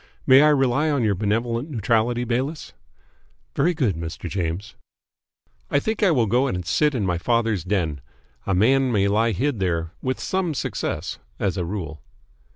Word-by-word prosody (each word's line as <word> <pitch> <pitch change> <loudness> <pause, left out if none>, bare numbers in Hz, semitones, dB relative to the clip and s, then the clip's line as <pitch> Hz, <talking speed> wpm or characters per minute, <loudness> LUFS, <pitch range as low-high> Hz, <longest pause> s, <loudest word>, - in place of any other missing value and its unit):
May 130 +1 +7
I 150 - +6
rely 140 +1 +2
on 140 -5 +1
your 105 -2 +2
benevolent 115 - -1
neutrality, 120 -1 +1
Bayliss?" 130 +6 -3 0.8
"Very 175 +1 +2
good, 125 - +1
Mr. 85 +2 -6
James." 90 +4 -3 1.0
"I - - +2
think 220 +9 -3
I 200 - +5
will 130 -9 +3
go 125 +6 +2
and 90 -7 -3
sit 150 - +2
in 110 -5 0
my 90 -2 0
father's 115 -3 0
den. 85 -7 -1 0.5
A 95 - +1
man 130 +6 +3
may 100 -3 +2
lie 110 +3 +2
hid 125 +3 -1
there 85 -3 -1
with 130 0 -2
some 185 -5 -1
success - - -3 0.2
as 100 -3 -1
a 90 -3 -2
rule." 85 -5 -5
115 Hz, 165 wpm, -23 LUFS, 95-135 Hz, 1.0 s, May